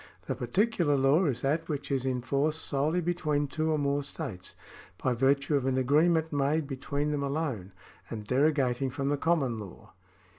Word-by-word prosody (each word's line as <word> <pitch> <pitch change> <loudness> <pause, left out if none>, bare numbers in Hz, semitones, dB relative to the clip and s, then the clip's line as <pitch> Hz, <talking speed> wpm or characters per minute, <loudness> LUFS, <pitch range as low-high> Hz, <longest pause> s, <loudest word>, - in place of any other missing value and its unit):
The - - -1
particular 170 - +1
law 140 +7 +4
is 125 -5 -1
that 160 +4 0
which 145 -2 -3
is 135 -1 0
in 125 -2 -1
force 140 +4 +1
solely 155 +2 0
between 155 -4 0
two 155 +3 -2
or 155 - +2
more 140 0 0
states, 140 - -7 0.4
by 130 - 0
virtue 140 +4 +2
of 135 -2 0
an 130 -1 +1
agree 145 +6 +4
ment 160 -2 0
made 145 +2 +1
between 140 +2 -2
them 145 -1 -1
alone, 140 - -2 0.4
and 110 -2 -6
derogating 135 0 +1
from 135 +2 -2
the 145 - +1
common 140 -8 +1
law. 100 -4 -11
140 Hz, 180 wpm, -29 LUFS, 130-155 Hz, 0.4 s, law